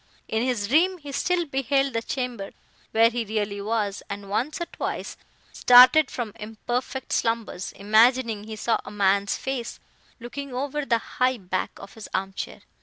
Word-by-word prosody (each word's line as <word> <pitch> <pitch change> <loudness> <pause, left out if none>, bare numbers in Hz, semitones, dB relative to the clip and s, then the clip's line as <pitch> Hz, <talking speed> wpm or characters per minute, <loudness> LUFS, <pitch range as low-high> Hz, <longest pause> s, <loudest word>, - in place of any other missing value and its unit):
In 220 - -1
his 240 -5 0
dream 350 - +3
he 290 -4 -9
still 345 +5 0
beheld 270 -1 0
the 230 - 0
chamber 245 -5 -4 0.4
where 230 +1 +4
he 240 0 -2
really 205 -2 -2
was, 210 -1 -1
and, 200 0 -7
once 265 - -1
or 345 - -2
twice, - - -5 0.4
started 255 +5 +7
from 230 -4 -5
imperfect 240 +4 -4
slumbers, 230 -5 -1
imagining 220 +1 +3
he 220 0 -7
saw 225 +2 0
a - - -9
man's 200 0 +1
face, 265 -3 -4 0.4
looking 260 +3 -7
over 285 +3 -2
the 230 - +3
high 255 +2 0
back 185 -2 -3
of 195 - -11
his 220 -2 -10
arm 195 +1 -2
chair. - - -6
230 Hz, 165 wpm, -25 LUFS, 205-265 Hz, 0.4 s, started